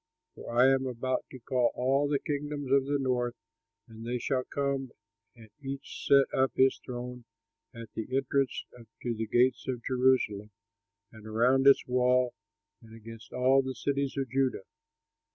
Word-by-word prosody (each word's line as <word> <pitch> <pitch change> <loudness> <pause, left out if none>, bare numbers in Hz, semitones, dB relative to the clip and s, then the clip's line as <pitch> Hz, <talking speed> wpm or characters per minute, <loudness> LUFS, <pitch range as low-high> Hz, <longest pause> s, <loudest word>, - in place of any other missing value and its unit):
For - - -9
I 125 - +7
am 135 0 0
about 130 +1 -2
to 130 - -10
call 125 0 0
all 135 +3 +1
the 145 - +2
kingdoms 145 -1 -4
of 135 -1 +4
the 145 +1 0
north, 125 -3 -1 0.5
and 115 -1 -11
they 120 +2 -2
shall 130 +1 -1
come 140 -2 -2 0.4
and 110 -3 -16
each 135 0 -7
set 140 -1 +6
up 130 0 +2
his 130 0 +3
throne 125 -1 -7 0.5
at 115 -2 -11
the 110 - -5
entrance 135 0 0 0.4
to 120 - -1
the 110 0 -4
gates 125 +4 +2
of 125 -3 -3
Jerusalem 125 -5 +1 0.6
and 110 -1 -13
around 125 +5 +3
its 140 - +6
walls 125 0 +2 0.5
and 115 -1 -14
against 115 0 -12
all 130 +2 +3
the 130 -1 -5
cities 140 +2 -2
of 135 -1 -1
Judah. 130 -5 0
130 Hz, 160 wpm, -29 LUFS, 120-135 Hz, 0.6 s, I